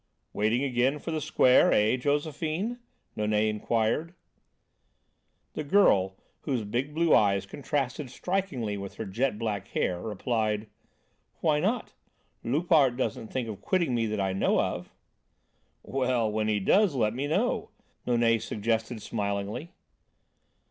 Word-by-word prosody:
"Waiting 110 +5 +1
again 130 +1 +1
for 165 - -6
the 155 -1 -2
Square, 135 -4 +4
eh, 105 +3 +3
Josephine?" 155 - -1 0.4
Nonet 105 0 +1
inquired. 115 +10 -1 1.4
The 155 - -3
girl, 100 - +4 0.3
whose 130 -6 -1
big 125 +8 -3
blue 165 0 +3
eyes 100 -2 +4
contrasted 135 +4 -3
strikingly 140 - -2
with 100 -1 -7
her 110 - -5
jet 110 +4 -1
black 105 -4 -3
hair, 90 -1 -1
replied: 110 0 -1 0.8
"Why 150 -2 +3
not? 215 +8 -1 0.5
Loupart 145 -2 +3
doesn't 115 -3 -2
think 125 -1 -3
of 105 -3 -7
quitting 175 -8 +1
me 115 -2 +1
that 105 -1 -2
I 95 -1 0
know 95 - +2
of." - - -2 0.9
"Well, 125 -4 0
when 110 0 -1
he 105 -1 +1
does 190 - +3
let 110 -4 +1
me 135 +4 -2
know," 155 - 0 0.4
Nonet 115 -2 +3
suggested 110 +1 -2
smilingly. 105 +7 -3
120 Hz, 130 wpm, -28 LUFS, 105-150 Hz, 1.4 s, Square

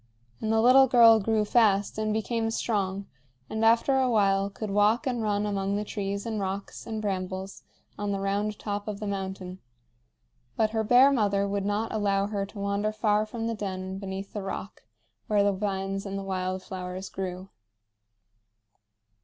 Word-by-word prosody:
And 220 - -1
the 220 0 +3
little 265 +2 +7
girl 230 -2 +7
grew 215 +1 +1
fast 205 -2 +2
and 215 0 0
became 225 +1 -1
strong, 200 -4 -1 0.5
and 220 +1 -1
after 230 +4 +4
a 260 -1 +2
while 200 -3 +2
could 205 +1 -6
walk 210 +6 +3
and 245 -3 -1
run 205 -1 0
among 200 -1 -1
the 210 +1 -2
trees 200 -1 -3
and 220 -2 -2
rocks 195 +3 -5
and 220 -1 -3
brambles 190 -1 -4 0.4
on 205 0 -1
the 195 - -1
round 200 +2 -1
top 205 0 -4
of 205 -1 -4
the 215 - -5
mountain; 190 -2 -5 1.0
but 215 -1 +2
her 220 -1 0
bear 250 +5 +6
mother 200 -6 +1
would 200 0 -2
not 205 +2 -1
allow 200 -2 +1
her 200 -1 -3
to 205 - -14
wander 200 +1 -1
far 215 0 +1
from 225 +1 -5
the 230 - -1
den 190 -2 -5
beneath 195 +1 -6
the 210 - -3
rock 195 0 -6 0.5
where 205 -1 +3
the 200 0 +2
vines 195 0 -3
and 195 0 -4
the 195 - -4
wild 185 -1 -3
flowers 185 0 -6
grew. 185 0 -6
205 Hz, 175 wpm, -27 LUFS, 195-220 Hz, 1.0 s, little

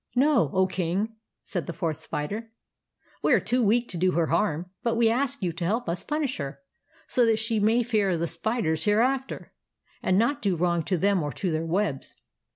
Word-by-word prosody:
"No, 265 - +4
O 190 0 +4
King," 185 +3 -1 0.4
said 175 -4 -4
the 170 - -4
Fourth 160 -2 -2
Spider; 210 +10 -4 0.4
" - - -35
we - - +3
are - - +5
too 250 +1 0
weak 235 +2 +3
to 180 - -5
do 185 +1 +2
her 170 -1 +2
harm; 170 -2 0
but 235 -1 0
we 230 -1 +4
ask 255 -1 -1
you 175 -2 0
to 170 - -5
help 220 +8 0
us 170 +1 -2
punish 295 -3 -2
her, 140 -1 -5 0.5
so 250 - +2
that 225 -1 +3
she 225 0 0
may 225 +4 +3
fear 210 -6 +1
the 165 - -1
spiders 165 -5 -1
hereafter, 255 +6 0 0.5
and 185 - +2
not 255 +7 +1
do 195 -3 +1
wrong 170 0 +1
to 185 - 0
them 195 +1 +2
or 145 -1 -2
to 185 - -2
their 160 +1 -1
webs." 165 -6 -2
200 Hz, 205 wpm, -26 LUFS, 170-235 Hz, 0.5 s, are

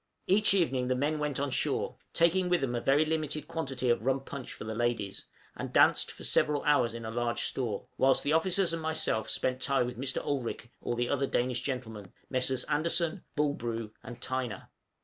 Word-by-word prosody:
Each 200 +1 +4
evening 135 -9 +1
the 130 - +1
men 150 +4 0
went 150 -3 -1
on 140 -1 -1
shore, - - 0 0.2
taking 180 +2 +3
with 180 -3 +3
them 130 -3 -1
a 120 - -1
very 145 +5 +4
limited 155 -1 -2
quantity 135 -6 -2
of 120 - 0
rum 135 +1 +1
punch 135 -2 -7
for - - -7
the 110 +1 -4
ladies, 115 -4 -1 0.3
and - - -5
danced - - +5
for - - -12
several 150 -2 +2
hours 125 -6 +3
in 115 -1 -6
a 110 - -4
large 120 0 -1
store; 115 -6 -1
whilst 135 0 +4
the 150 - +1
officers 180 +2 +2
and 165 - -2
myself 155 -9 0
spent 130 0 -1
the - - -2
time 135 -3 +2
with 125 -1 -6
Mr. 135 0 -2
Olrik 120 -4 -3
or 120 - -2
the 120 0 0
other 140 0 0
Danish 125 -1 0
gentlemen 115 -8 -5 0.2
Messrs. 130 0 +1
Andersen, 170 +4 +1
Bulbrue, 115 -7 -1
and 120 -1 -9
Tyner. 125 -5 -4
130 Hz, 200 wpm, -30 LUFS, 120-155 Hz, 0.3 s, danced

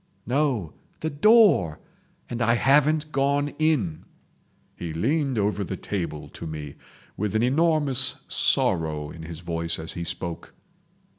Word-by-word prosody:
"No—the 130 - -2
door! 155 - +4 0.5
And 120 0 -5
I 115 0 +3
haven't 150 +4 +3
gone 140 +1 +1
in!" 135 - 0 0.7
He 85 -2 -6
leaned 135 - 0
over 105 0 0
the - - -5
table 85 -7 -4
to 85 - -8
me, 75 -2 -6 0.4
with 105 +1 -2
an 110 - +2
enormous 145 -1 +2
sorrow 80 -4 +1
in 80 - -10
his 80 0 -8
voice 85 -1 -1
as 80 +1 -3
he 85 - -4
spoke. 85 0 -5
110 Hz, 130 wpm, -25 LUFS, -, 0.7 s, door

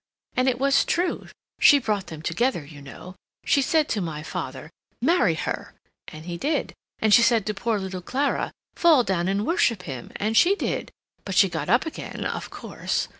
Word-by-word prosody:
And 255 +1 +3
it 250 - -1
was 275 +2 +3
true; 355 +1 -1 0.3
she 290 - +7
brought 210 -7 -2
them 155 -1 -9
together, 235 - 0
you 145 -1 -12
know. 140 +6 -10 0.3
She 280 - +3
said 310 +2 +2
to 210 - -1
my 155 -3 -4
father, 155 -3 -6 0.3
'Marry 260 - +3
her,' 160 - -4 0.3
and 155 +1 -10
he 175 -1 -5
did; 295 +2 -1 0.2
and 220 -1 +2
she 240 - +8
said 235 -4 +3
to 215 - -1
poor 220 +2 -1
little 190 -2 -5
Clara, 275 +10 -1 0.2
'Fall 320 -7 +5
down 185 -4 -1
and 200 +2 0
worship 235 - +1
him,' 135 -8 -7
and 215 +2 -1
she 350 - +5
did; - - -3 0.3
but 195 - -5
she 195 0 +5
got 160 -2 -4
up 240 - +3
again, 320 - -6
of - - -4
course. - - -3
210 Hz, 190 wpm, -24 LUFS, 175-265 Hz, 0.3 s, she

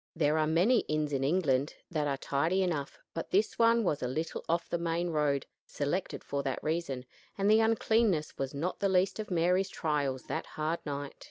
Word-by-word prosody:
There 155 -1 +2
are 155 - +2
many 185 +10 +4
inns 155 -1 -1
in 135 -1 0
England 145 -3 +1 0.2
that 150 -3 0
are 140 -1 0
tidy 160 +8 +1
enough, 155 -6 -2 0.2
but 165 - -4
this 205 +3 +1
one 230 0 +5
was 155 -7 0
a 125 - 0
little 155 +6 -3
off 170 +1 +1
the 170 - -2
main 170 +1 -1
road 145 -3 +1 0.2
selected 150 +6 -2
for 140 0 -2
that 135 -2 -3
reason 155 -5 -2 0.3
and 200 0 +1
the 220 - +6
uncleanness 220 -6 +2
was 135 -1 -3
not 170 +6 -2
the 200 - +2
least 190 +2 +2
of 215 - -4
Mary's 180 +2 +2
trials 145 -7 -1
that - - -4
hard 155 +2 0
night. 145 -1 -4
160 Hz, 195 wpm, -31 LUFS, 145-185 Hz, 0.3 s, the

